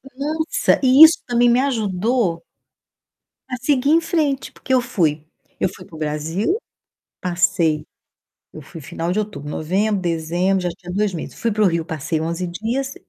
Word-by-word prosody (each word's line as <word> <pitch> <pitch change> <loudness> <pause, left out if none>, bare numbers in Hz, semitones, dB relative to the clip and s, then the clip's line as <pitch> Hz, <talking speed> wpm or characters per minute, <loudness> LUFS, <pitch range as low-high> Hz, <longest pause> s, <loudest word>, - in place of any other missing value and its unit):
Nossa, 315 - 0
e 265 +4 +8
isso 320 +1 +8
também 240 0 +3
me 240 +2 +4
ajudou 215 -7 0 1.1
a 250 - -2
seguir 275 0 +2
em 330 - +5
frente, 305 -5 -1
porque 260 - -4
eu 255 - +4
fui 155 -9 0 0.4
eu - - +2
fui 180 - -12
para 165 - -14
o - - -8
Brasil, 160 - -1 0.7
passei 175 -3 +1 0.7
eu 155 - -10
fui 165 +4 -11
final 165 +4 -4
de 190 - 0
outubro, 205 -9 -4
novembro, 195 +7 0
dezembro, 175 +2 0
já 175 - -1
tinha 175 +1 -9
2 205 0 0
meses, 160 - -6
fui 230 - -1
para 215 0 0
o - - +5
Rio, 170 -2 0
passei 160 0 -3
11 170 +3 -2
dias 235 +10 -3
190 Hz, 170 wpm, -20 LUFS, 165-250 Hz, 1.1 s, e